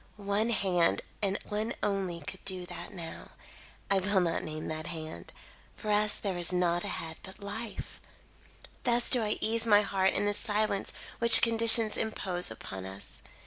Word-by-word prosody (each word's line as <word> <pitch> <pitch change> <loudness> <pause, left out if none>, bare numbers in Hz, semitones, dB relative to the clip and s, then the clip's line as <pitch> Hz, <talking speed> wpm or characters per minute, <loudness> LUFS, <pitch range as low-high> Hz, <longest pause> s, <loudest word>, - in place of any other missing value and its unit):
One 205 +2 -1
hand, 180 -6 +1 0.2
and 200 -1 0
one 215 +3 -3
only, 195 -4 -2
could 185 +6 -9
do 185 -2 -4
that 175 -1 -8
now. 170 -3 -9 0.6
I 195 - +3
will 195 +1 +1
not 175 -2 0
name 155 0 -6
that 155 +1 -5
hand. 155 - -7 0.4
For 215 - -4
us 210 0 +3
there 195 -3 -3
is 175 0 +4
nought 175 -1 +1
ahead 160 0 -4
but 190 +1 -11
life. 215 +2 -6 0.8
"Thus 240 -1 +3
do 250 - +4
I 210 -1 -1
ease 230 +1 +1
my 210 -1 +5
heart 190 -1 +1
in 205 - 0
the 205 - 0
silence 210 -2 -1 0.3
which 235 0 +9
conditions 230 -1 +4
impose 185 -5 0
upon 95 -4 -8
us. 95 +1 -10
195 Hz, 165 wpm, -29 LUFS, 175-215 Hz, 0.8 s, which